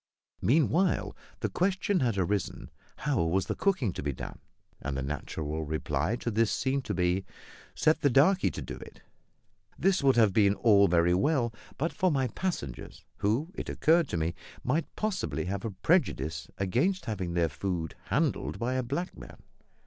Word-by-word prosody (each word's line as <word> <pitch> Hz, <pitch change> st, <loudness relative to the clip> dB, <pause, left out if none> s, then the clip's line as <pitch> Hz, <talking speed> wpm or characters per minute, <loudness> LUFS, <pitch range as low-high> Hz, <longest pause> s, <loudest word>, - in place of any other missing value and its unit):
Meanwhile 160 Hz, +7 st, +2 dB, 0.3 s
the -, -, +1 dB
question 190 Hz, +1 st, +1 dB
had 120 Hz, -6 st, +1 dB
arisen, 95 Hz, +1 st, -1 dB, 0.2 s
"How 145 Hz, -, 0 dB
was 85 Hz, +3 st, +1 dB
the -, -, -1 dB
cooking 150 Hz, -, +1 dB
to -, -, -5 dB
be 70 Hz, -, -1 dB
done?" 65 Hz, -, -7 dB, 0.4 s
and 70 Hz, -2 st, -3 dB
the 70 Hz, -, -2 dB
natural 75 Hz, +2 st, -4 dB
reply 80 Hz, +5 st, -1 dB
to 120 Hz, -, -1 dB
this 110 Hz, -1 st, +2 dB
seemed 130 Hz, +3 st, 0 dB
to 105 Hz, -, -2 dB
be, 90 Hz, +1 st, +1 dB, 0.5 s
"Set 155 Hz, -, +3 dB
the 145 Hz, -, +4 dB
darkie 160 Hz, +10 st, +4 dB
to -, -, -6 dB
do -, -, -7 dB
it." -, -, -12 dB, 0.8 s
This 190 Hz, -2 st, +2 dB
would 135 Hz, -1 st, +4 dB
have 110 Hz, -5 st, +4 dB
been 100 Hz, -1 st, +4 dB
all 100 Hz, -3 st, +5 dB
very 85 Hz, 0 st, +3 dB
well 120 Hz, -, +2 dB, 0.2 s
but 165 Hz, +4 st, -1 dB
for 185 Hz, -, +2 dB
my 135 Hz, -5 st, +1 dB
passengers, 135 Hz, -, -5 dB
who, 120 Hz, -, 0 dB
it -, -, -6 dB
occurred 165 Hz, 0 st, +3 dB
to 90 Hz, -, -2 dB
me, 80 Hz, +1 st, 0 dB, 0.3 s
might 160 Hz, 0 st, 0 dB
possibly 200 Hz, -, -2 dB
have 100 Hz, +2 st, -3 dB
a 115 Hz, -, -2 dB
prejudice 90 Hz, -, 0 dB
against 130 Hz, -, +1 dB
having 95 Hz, -6 st, -3 dB
their 85 Hz, -1 st, +3 dB
food 80 Hz, +2 st, -3 dB
handled 75 Hz, +4 st, 0 dB
by 120 Hz, +2 st, -1 dB
a 130 Hz, -, +1 dB
black 140 Hz, +9 st, -3 dB
man. -, -, -12 dB
110 Hz, 170 wpm, -29 LUFS, -, 0.8 s, all